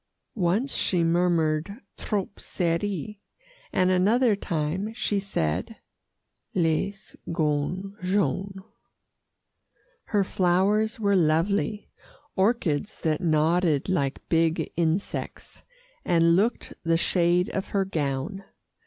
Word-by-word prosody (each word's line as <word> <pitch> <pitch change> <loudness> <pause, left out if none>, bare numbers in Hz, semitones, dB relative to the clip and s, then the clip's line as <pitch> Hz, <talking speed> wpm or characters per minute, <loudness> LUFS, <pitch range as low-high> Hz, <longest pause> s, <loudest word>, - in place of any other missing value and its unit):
Once 205 +7 0
she 175 -3 +1
murmured, 165 0 +1 0.2
"Trop 200 -2 -3
serrée;" 190 +3 -2 0.5
and 185 0 +2
another 215 +5 +3
time 180 +2 -2
she 210 -3 0
said, 80 - -2 0.8
"Les 185 +3 -1 0.2
gants 165 +5 -1
jaunes." 195 0 -1 1.4
Her 205 -2 +1
flowers 195 +5 +1
were 200 -2 +2
lovely 190 +6 +1 0.4
orchids 195 -4 0
that 155 +1 0
nodded 160 -1 +2
like 140 -7 -1
big 165 0 +1
insects, 170 +3 -2 0.4
and 170 -1 +4
looked 220 +6 0
the 165 -1 +2
shade 175 +1 +2
of 195 - -3
her 195 -1 0
gown. 155 +2 -3
180 Hz, 95 wpm, -26 LUFS, 165-200 Hz, 1.4 s, and